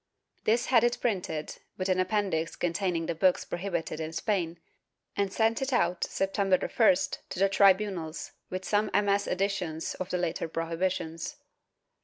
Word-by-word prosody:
This 235 Hz, +3 st, +3 dB
had 240 Hz, -3 st, +4 dB
it 240 Hz, 0 st, +2 dB
printed, 180 Hz, -9 st, -2 dB, 0.2 s
with 185 Hz, -, -1 dB
an 185 Hz, -1 st, +2 dB
Appendix 185 Hz, -4 st, 0 dB
containing 175 Hz, -1 st, -1 dB
the 170 Hz, -, -1 dB
books 180 Hz, +2 st, +2 dB
prohibited 175 Hz, -3 st, -3 dB
in 160 Hz, 0 st, -4 dB
Spain, 170 Hz, -3 st, -1 dB, 0.6 s
and 200 Hz, -1 st, 0 dB
sent 225 Hz, +3 st, +1 dB
it 270 Hz, +1 st, -1 dB
out, 180 Hz, -8 st, +2 dB
September 195 Hz, -1 st, +1 dB
1st, 205 Hz, -4 st, +2 dB
to -, -, -6 dB
the 195 Hz, +2 st, +4 dB
tribunals, 190 Hz, -5 st, +2 dB, 0.2 s
with 185 Hz, 0 st, -4 dB
some 210 Hz, 0 st, +1 dB
MS. 200 Hz, 0 st, +2 dB
additions 180 Hz, -4 st, -1 dB
of 185 Hz, +1 st, -5 dB
later 175 Hz, -2 st, -1 dB
prohibitions. 165 Hz, -, -2 dB
185 Hz, 145 wpm, -29 LUFS, 170-200 Hz, 0.6 s, had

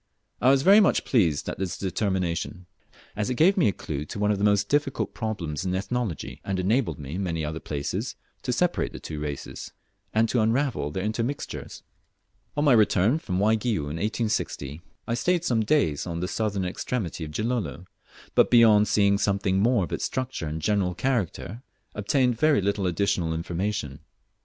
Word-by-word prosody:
I 125 Hz, -, +5 dB
was 135 Hz, 0 st, +4 dB
very 200 Hz, +5 st, +8 dB
much 205 Hz, -, +3 dB
pleased 85 Hz, -, +2 dB
at -, -, -4 dB
this 95 Hz, -3 st, -3 dB
determination, 95 Hz, -1 st, -2 dB, 0.5 s
as 105 Hz, +3 st, -1 dB
it 125 Hz, -, -1 dB
gave 175 Hz, +9 st, +5 dB
me 180 Hz, -, +3 dB
a -, -, +3 dB
clue 75 Hz, -6 st, -5 dB
to 75 Hz, -, -7 dB
one 105 Hz, +1 st, +2 dB
of 100 Hz, -, 0 dB
the -, -, -1 dB
most 100 Hz, -1 st, +3 dB
difficult 145 Hz, 0 st, 0 dB
problems 90 Hz, -9 st, -3 dB
in 95 Hz, -1 st, -1 dB
Ethnology, 100 Hz, -, -3 dB
and 95 Hz, -1 st, -2 dB
enabled 95 Hz, -, +1 dB
me 70 Hz, 0 st, -7 dB
in 95 Hz, -, -2 dB
many 80 Hz, -4 st, -2 dB
other 80 Hz, +1 st, -4 dB
places 70 Hz, -3 st, -3 dB, 0.3 s
to -, -, -2 dB
separate -, -, 0 dB
the -, -, -7 dB
two 75 Hz, -, -6 dB
races, 75 Hz, -2 st, -6 dB, 0.4 s
and 110 Hz, +1 st, +3 dB
to 120 Hz, -, +2 dB
unravel 115 Hz, -, +1 dB
their 95 Hz, +5 st, -4 dB
intermixtures. 115 Hz, +6 st, -4 dB, 0.7 s
On 145 Hz, -, +2 dB
my 140 Hz, -, +6 dB
return 110 Hz, -, +4 dB
from 90 Hz, -, -3 dB
Waigiou 110 Hz, 0 st, +1 dB
in 80 Hz, -, -4 dB
1860, 100 Hz, -, -2 dB, 0.3 s
I 115 Hz, -, -1 dB
stayed 175 Hz, +7 st, +1 dB
some 115 Hz, -6 st, +2 dB
days 105 Hz, -, +1 dB
on 85 Hz, -1 st, -3 dB
the 90 Hz, -, -2 dB
southern 100 Hz, -2 st, -1 dB
extremity 90 Hz, -2 st, -3 dB
of 75 Hz, -, -5 dB
Gilolo; 110 Hz, 0 st, -2 dB, 0.5 s
but, -, -, +4 dB
beyond 110 Hz, -3 st, +6 dB
seeing 100 Hz, -1 st, +3 dB
something 100 Hz, -2 st, +1 dB
more 115 Hz, 0 st, +3 dB
of 85 Hz, -, -5 dB
its -, -, -2 dB
structure 130 Hz, -10 st, -3 dB
and 75 Hz, +1 st, -4 dB
general 95 Hz, -3 st, +1 dB
character, 115 Hz, -2 st, -2 dB, 0.3 s
obtained 125 Hz, +3 st, +1 dB
very 155 Hz, -4 st, +4 dB
little 100 Hz, -1 st, 0 dB
additional 85 Hz, -2 st, 0 dB
information. 85 Hz, -4 st, -3 dB
100 Hz, 180 wpm, -26 LUFS, 85-120 Hz, 0.7 s, very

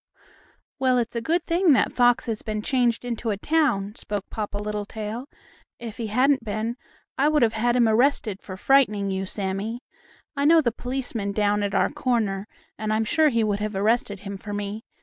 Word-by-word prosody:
"Well, 260 Hz, -1 st, +3 dB
it's 235 Hz, -1 st, -1 dB
a 235 Hz, -, -1 dB
good 335 Hz, +8 st, 0 dB
thing 340 Hz, -1 st, +4 dB
that -, -, +2 dB
fox 245 Hz, -1 st, +3 dB
has 225 Hz, -3 st, -3 dB
been 215 Hz, -1 st, -4 dB
changed 245 Hz, -2 st, +1 dB
into 235 Hz, -1 st, -3 dB
a 205 Hz, -, -1 dB
town," 235 Hz, -7 st, +1 dB
spoke 205 Hz, -2 st, -5 dB
Papa 210 Hz, -2 st, -4 dB
Littletail. 210 Hz, +3 st, -4 dB, 0.5 s
"If 230 Hz, -2 st, -8 dB
he 230 Hz, -2 st, -3 dB
hadn't 255 Hz, +4 st, +2 dB
been, 220 Hz, +2 st, -2 dB, 0.4 s
I 280 Hz, -, +4 dB
would 300 Hz, -3 st, +3 dB
have 225 Hz, -1 st, +3 dB
had 240 Hz, +2 st, +1 dB
him 240 Hz, -2 st, +4 dB
arrested 220 Hz, -3 st, +2 dB
for 185 Hz, -1 st, -8 dB
frightening 210 Hz, -5 st, +3 dB
you, 190 Hz, 0 st, -2 dB
Sammie. 200 Hz, +5 st, -3 dB, 0.5 s
I 280 Hz, 0 st, 0 dB
know 325 Hz, +2 st, +7 dB
the 250 Hz, -7 st, +1 dB
policeman 245 Hz, -4 st, -4 dB
down 205 Hz, 0 st, +1 dB
at 200 Hz, -1 st, -1 dB
our -, -, +2 dB
corner, 210 Hz, -5 st, -1 dB, 0.3 s
and 215 Hz, 0 st, -2 dB
I'm 220 Hz, +1 st, +1 dB
sure 315 Hz, +5 st, +3 dB
he 230 Hz, -4 st, +1 dB
would 205 Hz, -1 st, 0 dB
have 210 Hz, -1 st, -3 dB
arrested 205 Hz, -1 st, 0 dB
him 200 Hz, -1 st, -6 dB
for 205 Hz, +1 st, -7 dB
me. 205 Hz, +2 st, -4 dB
220 Hz, 190 wpm, -24 LUFS, 205-250 Hz, 0.5 s, know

